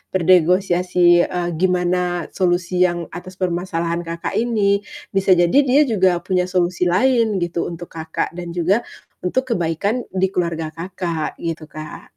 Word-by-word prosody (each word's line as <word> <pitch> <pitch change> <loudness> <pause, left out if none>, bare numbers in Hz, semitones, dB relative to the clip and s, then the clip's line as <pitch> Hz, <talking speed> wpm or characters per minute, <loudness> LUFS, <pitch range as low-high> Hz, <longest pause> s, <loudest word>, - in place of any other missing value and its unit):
bernegosiasi, 180 0 +4
eee, 175 -1 -2
gimana 180 -1 0
solusi 180 0 +1
yang 175 -1 -3
atas 185 +2 -9
permasalahan 170 -2 -2
Kakak 170 0 -4
ini, 210 -4 +2 0.3
bisa 195 -1 +3
jadi 175 -1 +3
dia 280 +1 +4
juga 185 -4 +2
punya 180 -1 0
solusi 180 -1 0
lain 225 +3 +2
gitu, 170 0 -2
untuk 170 0 -8
Kakak 160 -1 -3
dan 175 0 -7
juga 180 +5 +2 0.4
untuk 220 +9 -1
kebaikan 200 +5 -1
di 190 0 +1
keluarga 165 -4 -2
Kakak, 170 -1 -4
gitu, 165 -2 -5
Kak. 155 0 -9
180 Hz, 140 wpm, -20 LUFS, 170-185 Hz, 0.4 s, bernegosiasi